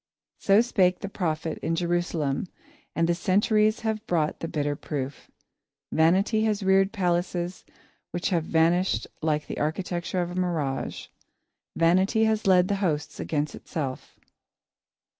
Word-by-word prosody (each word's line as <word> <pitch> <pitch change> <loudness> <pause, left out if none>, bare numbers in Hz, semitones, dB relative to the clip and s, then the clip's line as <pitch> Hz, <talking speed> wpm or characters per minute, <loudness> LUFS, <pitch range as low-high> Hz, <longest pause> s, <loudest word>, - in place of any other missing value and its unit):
So 200 +2 +5
spake 185 -6 +2
the 200 - -3
prophet 160 -4 -2
in 165 - -1
Jerusalem 170 -3 -1 0.5
and 165 0 +2
the 170 - +3
centuries 210 +5 +2
have 220 -1 -2
brought 160 -3 0
the 165 - -4
bitter 145 -3 -1
proof. 140 -2 -5 0.6
Vanity 190 +7 +3
has 210 -2 0
reared 190 +1 +4
palaces 175 -2 -1 0.5
which 175 +3 -2
have 170 -3 +1
vanished 170 +4 +2 0.2
like 150 -1 0
the - - -6
architecture 175 +3 -2
of 175 - -5
a - - -7
mirage. 160 -7 -2 0.7
Vanity 185 +6 +3
has 220 -2 +1
led 180 -1 +5
the 200 - 0
hosts 155 -6 -1
against 150 -1 -2
itself. 135 -5 -6
175 Hz, 135 wpm, -26 LUFS, 160-195 Hz, 0.7 s, So